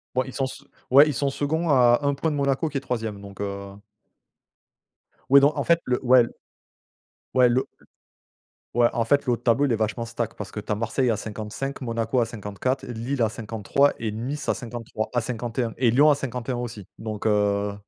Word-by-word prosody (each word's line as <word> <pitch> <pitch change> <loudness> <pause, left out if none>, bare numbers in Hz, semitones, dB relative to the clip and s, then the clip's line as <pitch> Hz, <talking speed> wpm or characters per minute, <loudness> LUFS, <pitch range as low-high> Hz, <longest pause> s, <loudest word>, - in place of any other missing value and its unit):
Bon, 130 - +2
ils 130 - -9
sont 135 -1 -1
se - - -10 0.3
ouais, 140 +4 +8
ils 150 - 0
sont 140 +3 0
seconds 160 +5 -1
à 125 -3 +5
1 140 -1 +1
point 160 +3 -1
de - - -2
Monaco 140 +3 +1
qui 140 - -3
est - - -16
3e, 110 -6 -4
donc, 100 0 -10
heu 100 0 -6 1.5
oui 140 +1 +9
donc, 145 +2 +4
en - - 0
fait, 170 0 +3
le 125 0 -1
ouais, 125 0 +7
l - - -5 1.1
ouais 125 -1 +6
le 130 +2 +1
l - - -23 0.9
ouais, 120 - +6
en 115 - +1
fait, 140 +6 +2
le 125 - +2
haut - - +2
de - - -24
tableau, 120 +4 +3
il 130 - 0
est - - +3
vachement 110 +2 -2
stack 115 0 -4
parce 105 - -7
que 105 - -5
tu 105 - -6
as - - +2
Marseille 115 +4 0
à 110 - +1
55, 110 +6 -5
Monaco 115 0 -1
à 120 - +3
54 115 +5 -3
et 125 - -6
Lille 120 +3 -3
à 110 - +2
53 115 +6 +1
et 110 -2 -2
Nice 125 +7 -4
à - - +3
53 115 -3 -5
à 120 - +2
51, 120 0 -3
et 125 -2 +3
Lyon 145 +6 +6
à 145 - +3
51 125 -2 -4
aussi, 110 -5 -6
donc, 110 -2 -5
heu 105 -1 +1
120 Hz, 220 wpm, -24 LUFS, 110-135 Hz, 1.5 s, oui